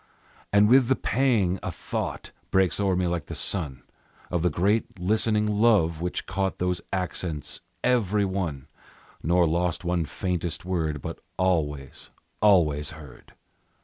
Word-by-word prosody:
And 100 +1 +5
with 130 +1 +6
the 130 - +3
pang 110 -11 +1
a - - -3
thought - - -4 0.2
Breaks 95 -1 +2
o'er 100 -2 +2
me 90 0 +1
like 85 -3 -2
the - - -6
sun, 70 -9 -3 0.5
Of 90 -2 0
the 90 - +3
great 100 +7 0
listening 105 +3 +1
Love 105 -7 +3
which 90 +1 -3
caught 95 0 -2
Those 90 0 -1
accents 90 -5 -3 0.2
every 105 -5 +2
one, 90 -8 -3 0.6
Nor 85 +2 +3
lost 85 +2 0
one 85 -1 0
faintest 90 0 -3
word, 80 -6 -2
but - - -5 0.2
always, 75 -7 -1 0.3
always 80 -8 +4
heard. 75 -5 -14
90 Hz, 140 wpm, -26 LUFS, 80-100 Hz, 0.6 s, with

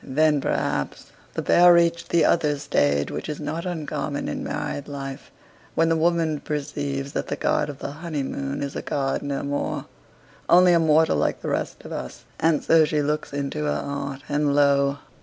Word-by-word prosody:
Then, 150 +1 +2
perhaps, 70 - -2 0.2
the - - -2
pair 175 0 +6
reached 170 -1 +3
that 170 - +3
other 150 -3 +2
stage 70 - +1
which 75 +1 -5
is 150 - -4
not 165 +4 -4
uncommon 150 -4 -3
in 75 - -3
married 145 - -4
life, 135 -2 -7 0.5
when 165 0 +3
the 165 - +3
woman 165 -2 +1
perceives 140 -2 -3
that - - -3
the - - -2
god 150 - 0
of 145 - -7
the 140 - -5
honeymoon 140 -3 -4
is 140 - -5
a - - -3
god 135 -1 -1
no 140 -1 -3
more; 145 0 -2 0.6
only 180 0 +7
a 170 - +5
mortal 160 0 +4
like - - 0
the - - -2
rest - - -3
of - - -8
us - - -6 0.2
and 160 -2 +2
so 165 -1 +5
she 150 -1 0
looks 150 +1 -2
into 140 +2 -3
her 150 - 0
heart, 140 -1 -5
and 145 -1 +1
lo! 140 -1 +3
145 Hz, 185 wpm, -24 LUFS, 140-160 Hz, 0.6 s, only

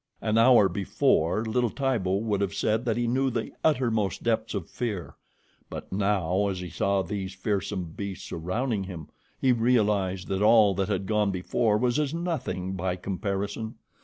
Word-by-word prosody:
An 110 -1 0
hour 115 -3 +6
before 95 +1 +1
little 120 +2 +1
Tibo 115 -8 0
would 105 -1 0
have 100 0 -1
said 110 +4 0
that 115 -2 0
he 120 - +1
knew 130 +3 +1
the 115 -2 -3
uttermost 120 -9 +1
depths 110 -1 0
of 95 -5 -3
fear; 105 -8 -4 0.6
but - - -8
now, 100 -1 +1
as 95 -2 -2
he 90 -1 -6
saw 100 -1 +1
these 95 +1 -4
fearsome 95 -3 -2
beasts 100 -2 -5
surrounding 100 +5 -2
him, 85 -5 -8 0.3
he 130 - +3
realized 105 -6 +1
that 95 0 -1
all 105 -2 +6
that 95 0 -1
had 95 - -1
gone 105 0 +1
before 105 +4 +1
was 120 +4 +1
as 150 +1 -1
nothing 135 - -3
by 95 -1 -1
comparison. 100 +4 -3
105 Hz, 165 wpm, -27 LUFS, 95-115 Hz, 0.6 s, hour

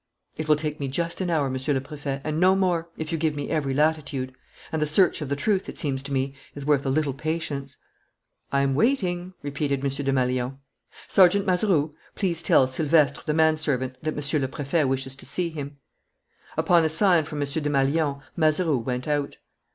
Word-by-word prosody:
"It 155 - -4
will 155 - +5
take 150 0 -3
me 140 - -2
just 170 +7 -2
an 180 - -1
hour, 155 -5 +1
Monsieur 130 +2 -1
le - - +1
Préfet, 140 0 -5
and 155 0 -2
no 185 +2 +5
more, 175 -3 0
if 160 +1 -4
you 165 - -1
give 155 -1 0
me 145 -1 -4
every 150 -4 0
latitude. 145 -3 0 0.4
And 160 - -1
the 150 - +2
search 170 +3 +3
of 145 - -4
the 140 - 0
truth, 195 +6 0
it - - -8
seems 135 -4 -1
to 140 +1 -7
me, 135 0 -1 0.2
is 140 -1 -6
worth 145 -2 +2
a - - +2
little 140 0 +1
patience." 145 -2 -4 0.7
"I'm 140 0 +2
waiting," 180 - 0
repeated 140 -1 -1
M. 140 -1 0
Desmalions. 130 -2 0 0.5
"Sergeant 195 +1 +5
Mazeroux, 180 -5 +2 0.2
please 175 -5 -1
tell 135 - +5
Silvestre, 145 +1 +2
the 150 - +1
manservant, 155 -5 +1
that 155 0 -2
Monsieur 145 +1 0
le 135 - 0
Préfet 145 +2 0
wishes 135 0 -2
to - - -8
see 170 +4 -2
him." 145 -2 -7 0.8
Upon 165 +1 +4
a 160 - +2
sign 170 0 +4
from 150 0 -6
M. 145 - +1
Desmalions, 140 0 0
Mazeroux 155 -3 +2
went 125 +3 -3
out. 145 -1 -1
150 Hz, 190 wpm, -25 LUFS, 140-160 Hz, 0.8 s, will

